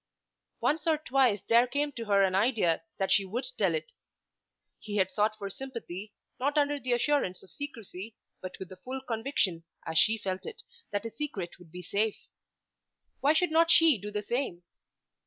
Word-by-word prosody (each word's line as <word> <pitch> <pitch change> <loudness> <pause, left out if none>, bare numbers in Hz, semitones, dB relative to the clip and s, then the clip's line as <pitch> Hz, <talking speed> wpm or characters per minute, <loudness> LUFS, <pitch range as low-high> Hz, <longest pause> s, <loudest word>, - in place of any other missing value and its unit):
Once 305 +2 +1
or 315 -1 +4
twice 255 -8 +2
there 235 +2 +5
came 290 +3 -1
to 235 -4 -6
her 200 -2 +4
an 190 -1 +2
idea 195 -5 +3 0.2
that 195 - 0
she 200 - +5
would 220 +7 -3
tell - - +3
it. 480 +1 -4 0.9
He 210 -1 -6
had 190 -2 +2
sought 215 +1 +1
for 200 - -5
sympathy, 215 -4 -7 0.2
not 285 +4 0
under 290 0 +2
the 250 -2 0
assurance 240 -7 +1
of - - -16
secrecy 225 -7 -7 0.3
but 185 0 -7
with 190 - -7
the 185 - -10
full 260 +7 -6
conviction, 225 -8 0 0.2
as 160 0 +2
she 220 +5 +4
felt 190 -2 -4
it, - - -7 0.3
that 205 0 -2
his 230 -1 -7
secret 210 -14 -4
would 170 -3 -16
be 180 +1 -8
safe. 205 +4 0 1.0
Why 290 +2 +4
should 350 +1 +2
not 330 +1 +4
she 325 -8 +7
do 205 +2 -6
the 210 0 -3
same? 235 -7 -2
225 Hz, 185 wpm, -30 LUFS, 190-275 Hz, 1.0 s, she